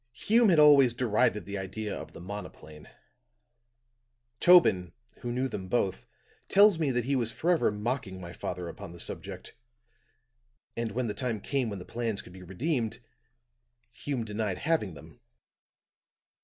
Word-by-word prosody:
"Hume 225 - +3
had 170 - +4
always 145 -5 +7
derided 105 -5 +1
the 100 +1 -4
idea 100 +3 -4
of - - -8
the - - -11
monoplane. 85 -5 -9 1.5
Tobin, 105 - +5 0.3
who 120 - -4
knew 130 +2 0
them 95 -7 -6
both, 95 -2 -1 0.4
tells 200 -3 +6
me 155 -4 +1
that 125 -2 0
he 140 +1 +1
was 115 -3 0
forever 170 +4 +2
mocking 105 -2 -3
my 85 -1 -8
father 90 -1 -5
upon 85 0 -9
the 85 - -12
subject. - - -7 1.2
And 115 -1 -2
when 125 +2 -1
the 105 - -2
time 120 -4 -2
came 130 +2 -1
when 100 - -5
the 90 - -9
plans 115 -3 -3
could 90 - -14
be 95 - -11
redeemed, 115 - -2 0.9
Hume 130 -6 -4
denied 105 -3 -2
having 145 - -1
them. 70 - -14
115 Hz, 150 wpm, -29 LUFS, 95-135 Hz, 1.5 s, always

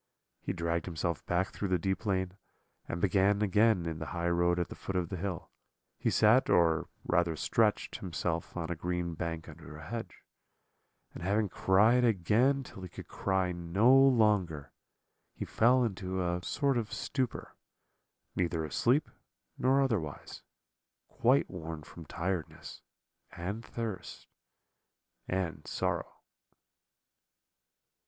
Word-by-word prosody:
He - - -3
dragged 85 -2 -2
himself 85 -1 -2
back 90 +2 +1
through 100 - -4
the 90 -1 +2
deep 95 +4 -2
lane, 95 -2 0 0.5
and 85 - -3
being 100 +3 +3
again 105 -2 +3
in 80 -1 -3
the - - -5
highroad 85 0 +1
at 85 -3 -1
the - - -8
foot 95 - -6
of 90 -2 0
the 95 - -4
hill, 90 -2 -4 0.5
he - - +1
sat, 110 +5 +4
or 80 -2 +3 0.2
rather 85 -1 +2
stretched, - - +1
himself 85 -1 -3
on 85 0 -3
a - - -1
green 90 +1 -2
bank 80 0 -4
under 75 - -11
a 80 - -10
hedge; 115 +3 -6 0.9
and - - -9
having 100 +3 +1
cried 110 +8 +4
again 120 +6 +3
till 95 - -11
he 90 - -7
could - - -10
cry 95 -2 0
no 90 +9 +3
longer, 105 - +3 0.6
he - - -4
fell 125 +3 +4
into 95 -4 -2
a 90 0 -1
sort 140 +5 +1
of 110 -2 -5
stupor, 130 -4 -3 0.8
neither 85 -3 0
asleep 125 - +2 0.5
nor 135 +2 +3
otherwise, 100 - -3 0.7
quite 130 +4 +3
worn 80 -4 -7
with 85 -2 -10
tiredness, 90 -1 -4 0.5
and 95 +6 -4
thirst, 110 -8 -6 1.0
and 85 -5 -3
sorrow. - - -2
90 Hz, 135 wpm, -31 LUFS, 85-110 Hz, 1.0 s, sat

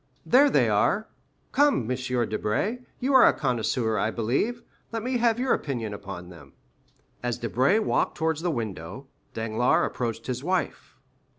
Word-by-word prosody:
There 280 +3 +5
they - - +3
are. - - +1 0.4
Come, 290 - +3
M. - - +1 0.3
Debray, 110 - -1 0.2
you 270 +3 0
are 260 - +8
a - - +5
connoisseur, 115 -3 0
I 110 - +1
believe, 135 - -1 0.3
let 225 -1 -3
me 255 +1 0
have 230 -1 +3
your 255 +1 +1
opinion 120 -7 -3
upon 100 -3 -8
them." 75 -6 -14 0.7
As 120 -1 -2
Debray 130 - +2
walked 220 - 0
towards 160 -1 0
the 175 - 0
window, 110 - -5 0.3
Danglars 110 +2 +1
approached 115 -2 -4
his 125 0 -4
wife. 185 +3 -2
125 Hz, 155 wpm, -26 LUFS, -, 0.7 s, are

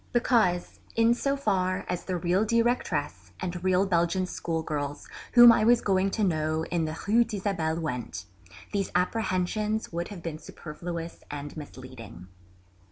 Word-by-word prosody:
Because, 225 -8 +2 0.2
in 230 +1 +4
so 275 +3 -1
far 185 -8 0
as 180 - -3
the 185 -1 -2
real 175 +4 +1
Directress 220 - 0
and 175 -1 -4
real 185 +1 +3
Belgian 175 0 +1
schoolgirls 155 -5 -3 0.3
whom 240 -1 +10
I 225 - +3
was 240 +2 +5
going 195 -1 +2
to 215 - +1
know 155 -3 0
in 170 -2 +1
the 155 +1 -4
Rue 230 +3 +5
d'Isabelle 190 -7 -2
went, 120 - -4 0.5
these 200 -2 0
apprehensions 210 +2 0
would 170 +1 -2
have 190 -5 -9
been 155 -2 -5
superfluous 170 +1 -7
and 145 0 -6
misleading. 130 - -10
180 Hz, 145 wpm, -27 LUFS, 160-210 Hz, 0.5 s, whom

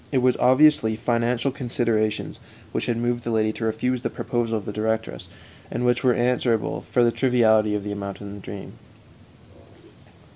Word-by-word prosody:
It 135 - +1
was 125 -1 +4
obviously 130 -4 +4
financial 120 +3 0
considerations 115 -5 -1 0.3
which - - -2
had 120 -2 0
moved 120 0 -1
the - - -4
lady 110 -1 +1
to 115 - -4
refuse 120 +3 -1
the - - -2
proposal 115 -2 -2
of 100 - -7
the - - -4
directress, 110 - -3 0.4
and 125 - -2
which 125 0 +2
were 125 -2 +4
answerable 120 -3 0
for 120 - +3
the 120 - +4
triviality 110 -5 +3
of 105 - -3
the 105 - -4
amount 100 -1 -5
in 100 -1 -8
the 100 - -9
dream. 100 0 -9
115 Hz, 175 wpm, -24 LUFS, 110-125 Hz, 0.4 s, was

